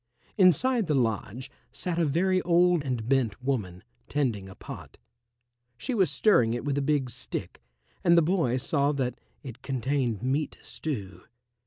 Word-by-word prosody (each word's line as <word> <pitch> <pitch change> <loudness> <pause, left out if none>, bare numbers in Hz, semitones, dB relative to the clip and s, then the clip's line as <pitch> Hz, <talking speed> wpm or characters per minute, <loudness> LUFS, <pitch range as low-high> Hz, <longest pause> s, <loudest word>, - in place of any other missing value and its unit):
Inside 215 - +4
the 150 - +2
lodge 120 +1 -1 0.2
sat 175 -2 -3
a 170 - +3
very 185 +6 +2
old 175 -2 +3
and 125 -5 -3
bent 125 -6 +1
woman, 105 -10 -2 0.2
tending 115 -10 -1
a 95 - -11
pot. - - -10 0.8
She 190 - -3
was 195 -6 +3
stirring 120 - +3
it 120 - -5
with 140 -1 0
a - - -1
big 140 -3 0
stick, - - -6 0.4
and 170 -2 +5
the 170 - +6
boy 160 -8 +1
saw 140 +2 +1
that 125 -3 -2 0.2
it 125 -2 -9
contained 130 -4 -1
meat 140 +3 -1
stew. 100 - -5
135 Hz, 155 wpm, -27 LUFS, 120-170 Hz, 0.8 s, the